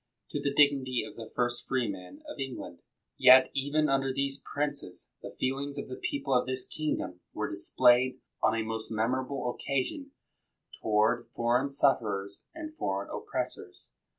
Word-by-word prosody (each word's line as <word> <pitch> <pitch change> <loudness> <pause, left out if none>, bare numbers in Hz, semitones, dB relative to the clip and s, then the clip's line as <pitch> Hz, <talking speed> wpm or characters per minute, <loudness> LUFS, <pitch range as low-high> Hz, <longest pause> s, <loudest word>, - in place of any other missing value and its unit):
to 145 - -2
the 140 - 0
dignity 140 -3 +3
of - - -10
the 110 -1 -8
first 120 0 0
freemen 100 -8 -3
of - - -8
England; 130 -10 -6 0.4
yet 130 0 +8
even 145 +3 +1
under 135 -1 +1
these 135 +1 -1
princes, 145 -10 -3
the - - -9
feelings 140 +2 -1
of - - -4
the 130 - -6
people 140 0 -2
of 125 0 +3
this 130 0 0
kingdom 95 -12 -3 0.2
were - - -1
dis - - -3
played, 125 +1 +5 0.2
on 110 - +3
a 115 - 0
most 110 0 -4
memorable 125 +3 -1
occasion, 140 - -2 0.7
toward 110 +2 +2
foreign 120 +4 +2
sufferers 105 -8 +1
and 310 -1 -7
foreign 100 +1 -2
oppressors. - - -5
130 Hz, 150 wpm, -30 LUFS, 115-140 Hz, 0.7 s, yet